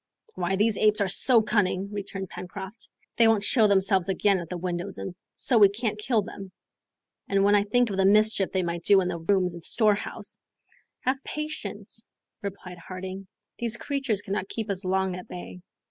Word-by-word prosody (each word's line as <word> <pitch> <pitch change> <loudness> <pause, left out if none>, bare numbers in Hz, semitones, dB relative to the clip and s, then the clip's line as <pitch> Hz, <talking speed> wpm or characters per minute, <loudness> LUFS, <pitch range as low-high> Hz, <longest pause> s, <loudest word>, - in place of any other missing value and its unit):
"Why, 180 - -1
these 210 +2 +2
apes 215 -1 +4
are 200 - +2
so 230 +4 +4
cunning," 200 -2 0
returned 195 -2 -5
Pencroft; 190 +4 -8 0.3
"they 230 - +6
won't 220 -2 +3
show 220 0 +5
themselves 195 -2 +2
again 195 0 +2
at 170 -2 -7
the 180 - -4
windows 180 +2 -4
and 190 - -5 0.2
so 240 -4 +2
we 200 -2 +8
can't 215 +1 -3
kill 220 -1 +1
them; 195 0 -9 0.8
and 195 0 +3
when 205 +1 +4
I 205 - +5
think 230 +3 +1
of 195 - -3
the 190 - +3
mischief 210 -1 +3
they 190 -1 0
may 170 0 -2
do 195 +3 +4
in 180 - -1
the 170 - -3
rooms 180 +1 +1
and 170 -1 -9
storehouse 210 +1 0 0.3
" - - -35
"Have 265 +1 0
patience," 305 +1 -5 0.3
replied 190 -3 -7
Harding; 185 +2 -7 0.3
"these 235 -1 -1
creatures 270 -7 -2
cannot 200 -1 -3
keep 225 -2 -3
us 195 0 -2
long 190 0 0
at 180 - -9
bay." 180 0 -9
200 Hz, 190 wpm, -26 LUFS, 185-215 Hz, 0.8 s, we